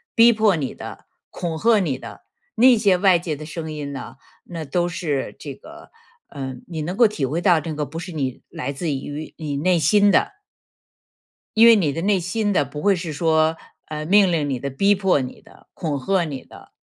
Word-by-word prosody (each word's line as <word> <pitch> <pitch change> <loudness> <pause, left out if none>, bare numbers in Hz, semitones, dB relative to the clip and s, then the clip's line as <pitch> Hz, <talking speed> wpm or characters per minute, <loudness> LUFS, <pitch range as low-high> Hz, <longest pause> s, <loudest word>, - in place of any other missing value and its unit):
逼 235 +1 +7
迫 215 -3 +3
你 140 -5 -3
的， - - -10 0.2
恐 170 -3 -4
吓 225 +1 +4
你 150 -9 -1
的。 - - -10 0.3
那 250 0 +6
些 200 -4 +3
外 185 -2 +4
界 165 -3 -4
的 155 - -9
声 160 0 -6
音 145 -2 -5
呢， 135 - -8 0.3
那 165 -2 -6
都 175 +5 0
是 150 -6 -3
这 140 -2 -7
个， 330 - -14 0.4
呃， 135 -3 -6
你 160 -3 -5
能 175 +5 -4
够 235 -1 +6
体 205 -9 -5
会 150 +6 -2
到 175 -3 +4
这 160 +1 -5
个 150 -1 -2
不 165 +3 -7
是 180 - -7
你 135 -5 -3
来 155 -4 -4
自 155 +3 -3
于 145 +3 -5
你 150 -3 -4
内 180 +5 +2
心 205 +5 +4
的。 200 - +2 1.2
因 230 +1 +8
为 230 - +8
你 160 -9 +1
的 165 - -3
内 200 +1 +2
心 205 +4 -1
的 145 -7 +2
不 150 +2 -8
会 200 -1 +3
是 165 -3 -5
说， 160 +1 +2 0.3
呃， 155 0 -5
命 195 +1 +5
令 150 -4 0
你 130 - -2
的， 140 - -4
逼 200 +9 +3
迫 190 -7 +2
你 125 0 -7
的， - - -20
恐 150 -5 -3
吓 190 +4 +1
你 140 -4 -6
的。 - - -16
165 Hz, 230 characters per minute, -22 LUFS, 145-195 Hz, 1.2 s, 因